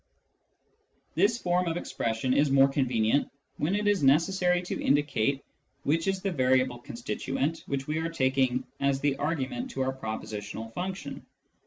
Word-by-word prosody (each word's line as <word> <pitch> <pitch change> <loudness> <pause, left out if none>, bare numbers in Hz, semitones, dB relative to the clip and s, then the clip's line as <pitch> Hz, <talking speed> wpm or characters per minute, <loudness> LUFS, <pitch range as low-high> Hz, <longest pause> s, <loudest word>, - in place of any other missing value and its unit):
This 225 +3 +3
form 180 -4 +1
of 165 0 -1
expression 115 -5 -1
is 145 +1 +3
more 135 0 +6
convenient 130 -2 +1 0.3
when 170 +7 0
it 210 0 0
is 205 -3 +3
necessary 180 +5 +3
to 175 - -4
indicate 140 -2 +1 0.4
which 165 +4 +1
is 195 -1 0
the 195 - 0
variable 130 -4 +2
constituent 135 +7 -3
which 135 -1 -2
we 155 +2 -1
are 165 +1 -1
taking 130 -4 +1 0.2
as 140 -1 +1
the 145 -1 +1
argument 155 - -2
to 135 - -4
our 130 0 -1
propositional 110 -2 -6
function. 185 +5 -5
140 Hz, 150 wpm, -28 LUFS, 130-175 Hz, 0.4 s, more